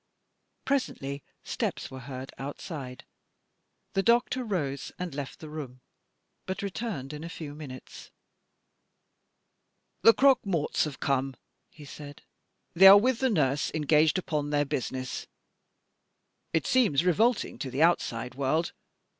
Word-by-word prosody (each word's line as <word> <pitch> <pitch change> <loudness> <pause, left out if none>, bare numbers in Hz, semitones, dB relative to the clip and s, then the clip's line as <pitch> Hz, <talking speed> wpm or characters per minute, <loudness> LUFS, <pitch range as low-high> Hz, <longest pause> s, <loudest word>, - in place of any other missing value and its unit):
Presently 140 - -1 0.2
steps - - -3
were 130 - -7
heard 130 +1 -7
outside. 135 -2 -7 0.9
The 195 - +2
doctor 240 +4 +2
rose 145 - -3
and 180 -3 -5
left 140 -1 -6
the 155 - -9
room 140 -5 -8 0.7
but 190 +1 -3
returned 195 - -4
in 150 +1 -7
a 165 - -6
few 155 -3 -7
minutes. 140 -4 -10 1.9
"The 230 - +7
croque 270 -2 +5
morts 170 -9 0
have 145 -4 -7
come," 135 -1 0 0.3
he 150 - -14
said. 145 0 -10 0.5
"They 190 +3 +8
are 195 +1 +11
with 240 +3 +2
the 265 - +2
nurse 145 - +1
engaged 155 +2 +3
upon 150 -5 -2
their 145 0 +1
business. 130 -1 -4 1.2
It 160 - 0
seems 200 - +3
revolting 220 +7 +2
to 135 - -4
the 135 +5 +1
outside 125 -8 +1
world. 140 +5 0
150 Hz, 130 wpm, -28 LUFS, 135-195 Hz, 1.9 s, are